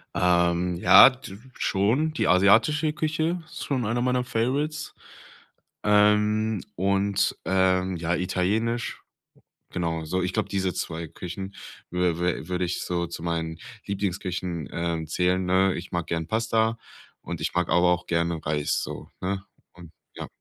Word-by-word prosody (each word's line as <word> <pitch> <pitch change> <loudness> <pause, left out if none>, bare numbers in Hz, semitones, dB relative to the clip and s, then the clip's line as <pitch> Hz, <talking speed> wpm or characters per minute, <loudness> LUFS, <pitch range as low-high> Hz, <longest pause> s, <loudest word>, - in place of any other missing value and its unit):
Ähm, 85 0 +2
ja, 90 +8 +9
d 125 -6 -11 0.2
schon. 120 +11 +1
Die - - 0
asiatische 115 - +4
Küche 155 +3 -1
ist - - -8
schon 130 -5 -1
einer 120 +3 0
meiner 125 0 +1
Favorites. 140 +6 -2 0.9
Ähm, 105 0 +3
und, 100 +2 +1
ähm, 95 -1 +2
ja, 85 +1 -1
Italienisch, 105 +7 -1 0.7
genau, 85 -2 -2
so. 90 +4 -1
Ich 90 - -2
glaube, 110 - -1
diese 95 -2 -1
2 80 0 -4
Küchen 95 +5 -7 0.4
wü 90 -2 0
wü 90 -3 -1
würde 90 0 0
ich 90 - -3
so 85 -1 -1
zu 85 - -8
meinen 80 -1 -3 0.3
Lieblingsküchen, 90 -5 -3
ähm, 85 -1 -2
zählen, 90 +3 +1
ne, 95 +1 +3
ich 90 - -7
mag 85 -2 -2
gern 80 -1 -2
Pasta 115 0 +1 0.4
und - - -6
ich - - -2
mag 90 -1 0
aber 90 0 +4
auch 90 0 -1
gerne 85 -1 -1
Reis 75 -1 0
so, - - -7
ne, 95 +1 -2 0.3
und, 85 -2 -13 0.2
ja. - - -6
95 Hz, 145 wpm, -25 LUFS, 85-110 Hz, 0.9 s, ja